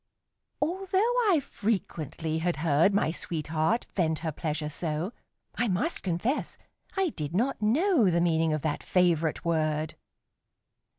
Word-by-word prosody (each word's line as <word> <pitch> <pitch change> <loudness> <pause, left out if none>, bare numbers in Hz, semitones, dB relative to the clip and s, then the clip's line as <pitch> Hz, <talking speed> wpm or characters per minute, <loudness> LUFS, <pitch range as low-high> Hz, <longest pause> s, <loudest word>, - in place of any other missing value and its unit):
Although 385 +6 +1 0.2
I 340 -5 +5
frequently 165 - -2
had 175 +1 0
heard 160 +5 +4
My 195 -5 +2
sweetheart 160 +5 -1
vent 160 -4 +1
her 160 - 0
pleasure 150 0 -3
so, 160 +6 -2 0.4
I 245 - 0
must 205 - 0
confess 190 - -1 0.4
I 385 -2 +2
did 155 - -5
not 240 +4 0
know 260 - +3
The 170 -1 +2
meaning 165 -2 +2
of 155 -2 -1
that 155 -2 -1
favorite 170 -4 +1
word. 155 -2 0
170 Hz, 130 wpm, -28 LUFS, 155-230 Hz, 0.4 s, I